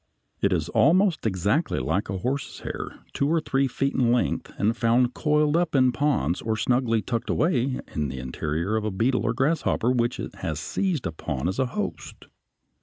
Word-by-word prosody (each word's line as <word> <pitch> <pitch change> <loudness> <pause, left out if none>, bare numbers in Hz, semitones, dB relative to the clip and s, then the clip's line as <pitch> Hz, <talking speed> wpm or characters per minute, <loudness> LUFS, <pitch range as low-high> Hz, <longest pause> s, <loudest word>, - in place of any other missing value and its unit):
It - - +2
is - - 0
almost 175 - +3
exactly 105 - 0
like 95 +7 -1
a 95 - -2
horse's 130 +8 -3
hair, - - -6
two 140 - +1
or 165 +1 +3
three 135 -3 +1
feet 135 +2 -1
in 120 -2 +2
length, 125 - 0
and 110 +3 +1
found 120 +1 +2
coiled 150 0 +2
up 170 -3 +1
in 130 -2 +5
ponds 125 - 0
or 110 -1 -1
snugly 115 -1 +1
tucked 115 -2 -3
away 135 -5 +1
in 75 -1 -1
the 65 0 -6
interior 75 +9 -2
of 110 - -2
a 110 - 0
beetle 115 +6 +1
or 115 - +1
grasshopper 135 -2 +1
which 120 -1 0
it - - -5
has 80 -4 -3
seized 165 - -1
upon 80 -3 -3
as 95 - -2
a 130 - +2
host. 210 +11 -5
120 Hz, 185 wpm, -25 LUFS, 95-140 Hz, -, in